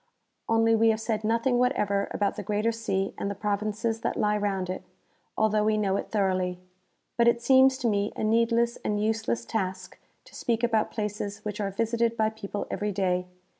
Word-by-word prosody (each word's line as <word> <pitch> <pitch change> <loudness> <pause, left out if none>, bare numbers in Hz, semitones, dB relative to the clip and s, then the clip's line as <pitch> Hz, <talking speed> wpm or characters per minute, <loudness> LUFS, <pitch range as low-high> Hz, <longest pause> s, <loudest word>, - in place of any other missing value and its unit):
Only 225 0 +4
we 225 0 +4
have 220 -1 +1
said 220 -1 -2
nothing 230 +3 +1
whatever 205 -6 +1
about 200 -1 -1
the 210 - -5
Ctrkatkr 210 +3 0
Sea 195 -4 -2
and 200 - -2
the 200 - -4
pro 210 0 0
vinces 215 +2 -2
that - - -2
lie 210 0 +2
round 200 -3 -1
it, 185 +1 -4 0.6
although 215 -1 +2
we 215 0 +2
know 195 -2 +1
it - - -3
thoroughly. 185 -3 0 0.6
But 235 0 +4
it 235 0 +4
seems 265 +2 +5
to 245 - -1
me 205 -1 +1
a - - -3
needless 230 +2 +2
and 210 0 0
useless 215 - -1
task 185 - -4 0.3
to - - -18
speak 230 -1 -1
about 225 -2 +2
places 210 -1 -4
which 210 0 -3
are 200 - -1
visited 230 +3 0
by 220 0 +2
people 205 -2 -5
every 210 0 -1
day. 180 -2 0
215 Hz, 195 wpm, -27 LUFS, 200-225 Hz, 0.6 s, seems